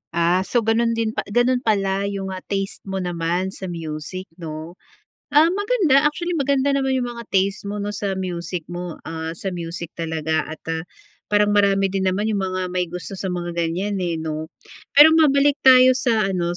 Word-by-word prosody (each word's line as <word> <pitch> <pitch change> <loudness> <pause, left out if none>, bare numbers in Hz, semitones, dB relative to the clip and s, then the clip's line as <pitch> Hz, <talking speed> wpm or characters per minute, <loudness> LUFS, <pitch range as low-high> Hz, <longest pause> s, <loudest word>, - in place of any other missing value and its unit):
Ah, 170 +2 +3
so, 240 +2 +1
gano'n 230 +1 +2
din 225 -1 0
pa - - -4
gano'n 245 +4 +2
pala 200 -4 0
yung, 195 -1 -4
ah, 185 - -5
taste 195 -1 -3
mo 195 - -4
naman 175 +2 -1
sa 190 -1 -7
music 165 +1 -5 0.2
'no? 160 +1 -7 0.5
Ah, 310 +3 +5
maganda, 400 - +3
actually 345 +4 -1
maganda 280 -3 +1
naman 270 -1 +1
yung 245 -1 -1
mga 235 -1 -9
taste 195 +1 0
mo 205 - -4
'no 205 0 -3
sa 200 -1 -3
music 175 -2 -4
mo, 175 -1 -5
ah, 160 0 -5
sa 190 +1 -4
music 170 -1 -6
talaga 160 -1 -1
at, 155 - -9
ah, 160 0 -3 0.4
parang 205 0 +3
marami 195 -1 +3
din 190 -1 +1
naman 195 +3 0
yung 205 -2 0
mga 185 -1 -2
may 180 -1 -1
gusto 180 +3 -7
sa 190 - -3
mga 175 -1 -3
ganyan, 175 +4 -2
eh, 175 -2 -1
'no? 160 0 -4 0.5
Pero 305 +2 +9
mabalik 285 -2 +4
tayo 255 -1 +7
sa 235 -5 +1
ano 175 -1 -1
195 Hz, 190 wpm, -22 LUFS, 175-235 Hz, 0.5 s, Pero